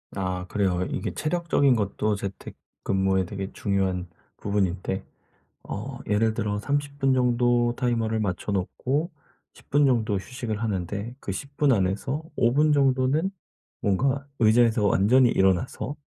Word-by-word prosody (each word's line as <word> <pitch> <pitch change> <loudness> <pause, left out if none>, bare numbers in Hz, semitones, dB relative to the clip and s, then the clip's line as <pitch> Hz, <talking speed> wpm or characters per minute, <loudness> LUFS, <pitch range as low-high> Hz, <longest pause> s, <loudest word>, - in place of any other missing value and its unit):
아 90 -2 -2
그래요. 95 -3 0
이게 - - -3
체력적인 155 -5 +2
것도 105 0 0
재택 100 -1 -7 0.3
근무에 95 -1 +1
되게 95 +2 -5
중요한 95 -3 -1 0.3
부분인데 95 -1 -1 0.6
어 130 +6 -6
예를 110 +1 +2
들어 105 -1 -2
30 145 +3 -2
분 135 -1 +3
정도 120 -1 +2
타이머를 115 -3 0
맞춰 100 -1 -2
놓고 130 - -1 0.4
10 - - -20
분 145 +1 +4
정도 115 -6 +2
휴식을 110 +1 -4
하는데 100 +3 -3
그 100 - -5
10 140 +8 -8
분 145 -2 +4
안에서 105 +9 -1
5 120 +1 +3
분 150 +2 +4
정도는 135 +4 +2 0.5
뭔가 135 +8 +1
의자에서 110 -1 +4
완전히 120 +7 +4
일어나서 95 +9 +1
110 Hz, 270 characters per minute, -25 LUFS, 95-130 Hz, 0.6 s, 분